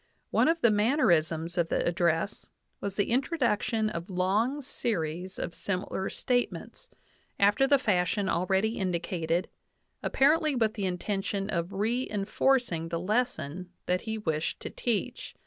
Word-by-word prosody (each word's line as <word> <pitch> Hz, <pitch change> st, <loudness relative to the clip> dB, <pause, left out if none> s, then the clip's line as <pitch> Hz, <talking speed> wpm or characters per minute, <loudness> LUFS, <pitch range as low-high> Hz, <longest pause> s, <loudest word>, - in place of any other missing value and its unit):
One -, -, +4 dB
of 330 Hz, +1 st, +2 dB
the 235 Hz, -, +5 dB
manner 220 Hz, -, +3 dB
isms 165 Hz, +1 st, +1 dB
of 165 Hz, -1 st, +1 dB
the -, -, 0 dB
address 170 Hz, +2 st, 0 dB, 0.3 s
was 200 Hz, -1 st, -4 dB
the 205 Hz, +2 st, 0 dB
introduction 240 Hz, -5 st, +1 dB
of 170 Hz, 0 st, -5 dB
long 210 Hz, +10 st, +1 dB
series 185 Hz, -7 st, -3 dB
of -, -, -4 dB
sim 185 Hz, -2 st, -2 dB
ilar 190 Hz, -, -3 dB
statements, 250 Hz, -, -2 dB, 0.5 s
after 205 Hz, +7 st, +4 dB
the 280 Hz, 0 st, +5 dB
fashion 200 Hz, -4 st, +1 dB
already 190 Hz, +6 st, +1 dB
indicated, 175 Hz, -2 st, -1 dB, 0.5 s
apparently 305 Hz, +2 st, +3 dB
with 220 Hz, -3 st, +2 dB
the 200 Hz, -3 st, -2 dB
intention 195 Hz, +2 st, -2 dB
of 170 Hz, 0 st, -1 dB
re 230 Hz, +6 st, 0 dB
enforcing 205 Hz, -4 st, +1 dB
the 170 Hz, -, -2 dB
lesson 185 Hz, -, -1 dB, 0.2 s
that 180 Hz, 0 st, +1 dB
he 220 Hz, -1 st, -3 dB
wished 160 Hz, -6 st, -2 dB
to -, -, -6 dB
teach. 235 Hz, -4 st, -3 dB
200 Hz, 145 wpm, -29 LUFS, 175-235 Hz, 0.5 s, the